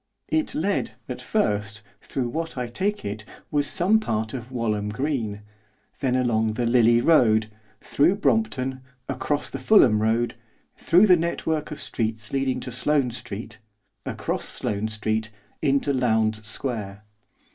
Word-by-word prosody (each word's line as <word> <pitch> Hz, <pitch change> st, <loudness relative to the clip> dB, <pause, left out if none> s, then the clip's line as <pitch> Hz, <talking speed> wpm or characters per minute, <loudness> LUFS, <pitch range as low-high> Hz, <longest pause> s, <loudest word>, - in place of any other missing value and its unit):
It 315 Hz, -1 st, 0 dB
led, 200 Hz, +6 st, 0 dB
at -, -, -5 dB
first, 105 Hz, -, -1 dB, 0.2 s
through 130 Hz, -3 st, -3 dB
what, 160 Hz, +2 st, -4 dB
I 125 Hz, -, -1 dB
take 195 Hz, -, -2 dB
it, 105 Hz, +1 st, -4 dB, 0.3 s
was 145 Hz, -1 st, +2 dB
some 200 Hz, +5 st, +3 dB
part 110 Hz, -, -2 dB
of 125 Hz, -1 st, -6 dB
Walham 105 Hz, -4 st, -1 dB
Green; 110 Hz, -4 st, -2 dB, 0.6 s
then 130 Hz, -2 st, +1 dB
along 110 Hz, -4 st, +1 dB
the 120 Hz, +2 st, -1 dB
Lillie 120 Hz, 0 st, +4 dB
Road, 110 Hz, -8 st, +4 dB, 0.3 s
through 165 Hz, +7 st, +2 dB
Brompton, 135 Hz, -12 st, 0 dB, 0.3 s
across 145 Hz, 0 st, -1 dB
the -, -, -6 dB
Fulham 120 Hz, -, +5 dB
Road, 115 Hz, +2 st, +1 dB, 0.4 s
through 180 Hz, +5 st, +5 dB
the 185 Hz, -3 st, +7 dB
network 160 Hz, -2 st, -1 dB
of 150 Hz, -, -6 dB
streets 110 Hz, -1 st, -3 dB
leading 135 Hz, -2 st, 0 dB
to 125 Hz, -, -6 dB
Sloane 125 Hz, +1 st, +1 dB
Street, 110 Hz, -2 st, -7 dB, 0.4 s
across -, -, -3 dB
Sloane 105 Hz, +1 st, -2 dB
Street 110 Hz, 0 st, -2 dB, 0.3 s
into 140 Hz, -1 st, +2 dB
Lowndes 110 Hz, -4 st, +1 dB
Square. 105 Hz, -4 st, -3 dB
120 Hz, 140 wpm, -24 LUFS, 110-145 Hz, 0.6 s, the